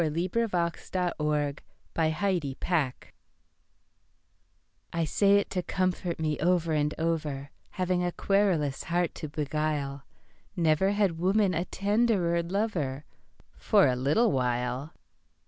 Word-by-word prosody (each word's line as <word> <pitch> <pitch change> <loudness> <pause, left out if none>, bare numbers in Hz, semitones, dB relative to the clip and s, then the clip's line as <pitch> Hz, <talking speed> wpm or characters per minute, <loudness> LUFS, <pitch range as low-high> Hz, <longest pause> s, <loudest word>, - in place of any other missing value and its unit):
The 165 - +2 0.3
Cynic 230 -1 +1
Theodosia 165 -4 -1 0.4
Garrison 160 -4 0 1.9
I 170 - 0
SAY 200 +5 +4
it 200 - -1
to 185 - 0
comfort 180 -2 -1
me 155 -2 -1
over 170 -1 +2
and 150 0 0
over, 150 -4 -2 0.2
Having 180 -1 -1
a 175 - 0
querulous 180 -9 +1
heart 175 0 0
to 155 - -6
beguile, 145 -2 -2 0.5
Never 170 +3 +2
had 195 -6 +1
woman 190 +2 +2
a 170 +2 -1
tenderer 200 -5 +1
lover—For 180 - -1
a 130 -2 +2
little 150 - +2
while. 125 +3 -1
170 Hz, 110 wpm, -28 LUFS, 150-185 Hz, 1.9 s, SAY